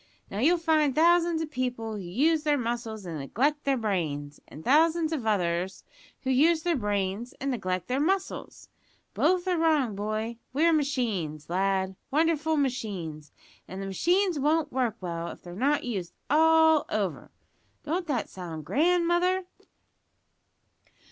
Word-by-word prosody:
Now, 200 - -4
you'll 330 +9 +4
find 315 -4 +2
thousands 335 0 +4
of 305 - -7
people 245 -4 -3
who 210 - -5
use 280 - +1
their 300 -1 +2
muscles 230 -4 -4
and 165 -3 -5
neglect 280 - 0
their 275 -1 +2
brains, 155 -10 -2
and 155 - -11
thousands 320 +4 +3
of 255 -8 -3
others 180 -2 0 0.4
who 265 - 0
use 315 +5 +3
their 345 -1 +1
brains 205 +2 -2
and 275 0 -1
neglect 185 -6 -2
their 255 +2 0
muscles. 380 +5 -2 0.5
Both 365 0 +2
are 360 -2 +1
wrong, 300 -9 +2
boy; 215 +3 -3 0.2
we're 325 +4 +3
machines, 210 - -1
lad 190 0 0
wonderful 320 +1 +1
machines 190 - -3 0.4
and 190 - -7
the 195 - -4
machines 350 - +1
won't 300 +1 +1
work 250 -4 0
well 170 -2 -4
if - - -9
they're 175 - -9
not 280 +9 +1
used 195 -8 -4 0.2
all 320 0 +5
over.' 200 -6 -2 0.5
Don't 345 +4 -2
that 260 -7 -1
sound 165 -5 -8
grand, 345 - +2
mother?" 360 +2 +2
255 Hz, 150 wpm, -27 LUFS, 195-320 Hz, 0.5 s, all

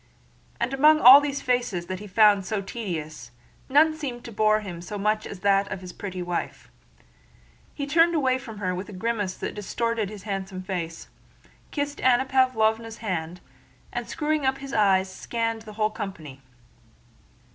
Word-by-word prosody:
And 255 - -1
among 305 +3 +5
all 265 +2 +10
these 285 -1 -3
faces 240 -8 0
that 185 +1 -5
he 210 - -9
found 205 0 +5
so 200 +2 -2
tedious, 170 - -6 0.4
none 310 +3 +5
seemed 260 -6 -6
to 235 - -8
bore 215 0 +2
him 175 -5 -7
so 205 +4 -6
much 215 +2 0
as 190 - -9
that 200 0 +2
of 190 - -5
his 180 -1 -9
pretty 185 -3 -6
wife. 175 - -5 1.0
He 280 - -3
turned 330 +4 +3
away 260 -4 +2
from 230 -4 -10
her 185 -3 -2
with 185 +3 -6
a - - -9
grimace 205 -1 -2
that - - -5
distorted 220 +1 -2
his 205 -2 -10
handsome 190 -2 -5
face, 175 -3 -5 0.6
kissed 285 -1 -3
Anna 255 0 +4
Pávlovna's 230 -4 +1
hand, 180 -5 -4 0.5
and - - -4
screwing 310 -1 -1
up 265 0 +1
his 275 0 -8
eyes 195 -3 +3
scanned 230 +3 -3
the 215 -1 -11
whole 215 0 0
company. 165 -11 -7
215 Hz, 170 wpm, -25 LUFS, 190-255 Hz, 1.0 s, all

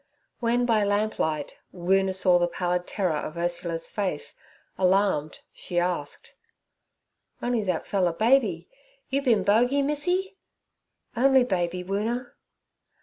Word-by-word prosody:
When 240 +1 +1
by 225 -3 +3
the 205 - +1
lamplight 205 -8 -1
Woona 190 +1 +1
saw 180 -1 +4
the 175 - +2
pallid 180 0 -2
terror 180 -7 -1
of 155 +2 -6
Ursula's 170 -1 -2
face, 190 -8 -3 0.4
alarmed, 185 -5 +1
she 175 - -5
asked: 175 -4 -2 1.1
'On'y 240 -2 0
that 180 -4 -1
fella 185 -3 +1
baby, 235 +10 +2 0.4
you 275 +1 +1
bin 230 -8 +2
bogey 245 +8 +3
Missy?' 355 +7 -1 0.8
'Only 265 +1 +5
baby, 180 -5 -1
Woona.' 225 +6 -2
195 Hz, 120 wpm, -26 LUFS, 175-240 Hz, 1.1 s, Only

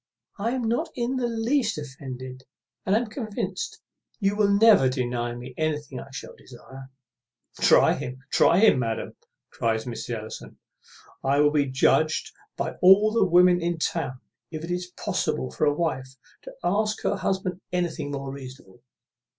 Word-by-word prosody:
I 230 +4 0
am 260 -2 -2
not 240 +9 0
in 245 +1 -1
the 245 -2 0
least 230 - 0
offended, 130 -2 -8 0.4
and 195 - +3
am 235 +3 +2
convinced 215 -2 -5 0.4
you 200 -1 +1
will 205 -1 +3
never 200 - +6
deny 120 -2 -2
me 125 +1 -9
what 150 -4 -3
I - - -17
shall 135 - -8
desire." 130 +2 -13 0.7
"Try - - +5
him, 125 +1 -5
try 170 - +4
him, 205 -9 +5
madam," 115 -2 -3 0.4
cries 110 -1 -1
Mrs. 120 0 -4
Ellison; 110 0 -9 0.7
"I 140 +1 +2
will 145 0 +5
be 145 -2 +2
judged 155 +4 +2 0.3
by - - -3
all 195 +4 +7
the 230 -2 +3
women 180 0 +5
in 170 0 -1
town 140 -5 -2 0.3
if 155 -1 -6
it 170 - -5
is 180 0 -2
possible 65 - -2
for 155 - 0
a 145 -1 +2
wife 135 -5 -2 0.3
to - - -10
ask 215 +1 0
her - - 0
husband 190 -1 -2
anything 175 -5 -2
more 135 -1 -4
reasonable. 130 -6 -11
155 Hz, 160 wpm, -25 LUFS, 130-205 Hz, 0.7 s, all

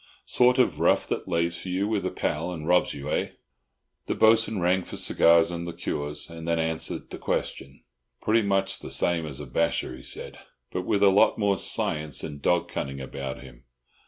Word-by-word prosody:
Sort 125 0 +4
of 95 - +2
rough 85 - +3
that - - -3
lays 85 -1 0
for 95 - -7
you 95 +3 0
with 105 -2 -1
a - - -1
pal - - -2
and 80 -3 -6
robs 90 0 +3
you, 70 +1 -5
eh?" - - -1 0.7
The - - -1
Bo'sun 110 -1 +4
rang 90 +1 +2
for - - -8
cigars 85 0 +4
and 85 0 -4
liqueurs, 75 -4 -4
and 85 0 -9
then 85 0 +1
answered 80 0 -2
the - - -6
question. 70 0 -3 0.4
"Pretty 115 +1 +2
much 95 -1 0
the - - -8
same 85 -2 +2
as 70 -3 -7
a 75 - -6
basher," 65 -1 -1
he 65 - -12
said, - - -7 0.3
"but - - -4
with 100 - +2
a 100 - +8
lot 105 +3 +4
more 100 -3 +1
science 75 -2 0
and 70 -1 -7
dog 85 +2 +2
cunning 70 0 -4
about 65 0 -6
him. - - -15
85 Hz, 195 wpm, -26 LUFS, 75-95 Hz, 0.7 s, a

